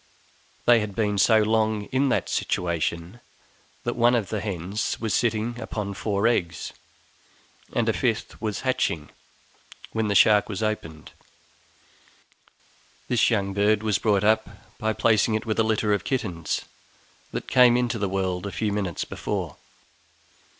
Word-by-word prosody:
They 120 -1 +6
had 105 -2 -4
been 105 -2 0
so 110 +1 +5
long 110 -1 +1
in 135 +1 +2
that - - 0
situation, 85 +3 -2 0.6
that 120 - -2
one 120 +1 +4
of 110 -5 -1
the 110 -2 -2
hens 100 0 -3
was 110 -3 -2
sitting 120 +1 0
upon 105 -4 -4
four 100 +1 -1
eggs, 85 -8 -1 1.0
and - - +1
a - - +3
fifth - - -2
was 110 -3 -2
hatching, 85 - -1 0.8
when 110 -1 -1
the 100 - 0
shark 105 +2 +5
was 105 0 -3
opened! 80 -8 -4 2.0
This 125 - +3
young 100 -4 0
bird 105 +1 +2
we 110 -1 0
brought 105 -3 +2
up 110 +1 +2 0.3
by 110 0 0
placing 110 0 +2
it 110 - -2
with 110 -1 -1
a - - +5
litter 110 -1 +1
of 100 -2 -1
kittens 90 - -2 0.7
that - - -5
came 125 -1 +6
into 120 -2 -1
the 100 -1 -1
world 95 -1 -2
a - - -5
few 105 -1 -1
minutes 95 -5 -2
before. - - -4
105 Hz, 150 wpm, -25 LUFS, 100-115 Hz, 2.0 s, They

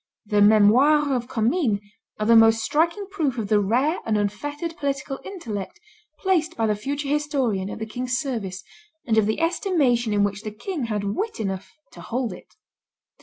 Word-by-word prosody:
The 205 0 +2
Memoires 245 +9 +5
of 245 -2 -1
Commynes 235 - +1 0.4
are 215 - 0
the 230 +1 +5
most 225 0 +6
striking 335 - +1
proof 295 -10 -1
of 215 -3 -3
the 210 - +4
rare 250 - +1
and 220 -2 0
unfettered 290 - -3
political 275 -3 -3
intellect 235 - -6 0.4
placed 365 -5 0
by 225 - +1
the 210 -1 +1
future 280 +7 -4
historian 275 -10 0
at - - -6
the 220 - -4
king's 245 +3 -2
service, 220 -10 -4 0.4
and 225 - +1
of 210 - +2
the 220 - -1
estimation 300 - +1
in 205 -1 +2
which 205 0 -1
the 215 - -5
king 275 - -4
had 210 -3 -2
wit 230 - -3
enough 195 -3 -4 0.2
to - - -12
hold 245 0 -3
it. - - -15
240 Hz, 175 wpm, -24 LUFS, 210-295 Hz, 0.4 s, most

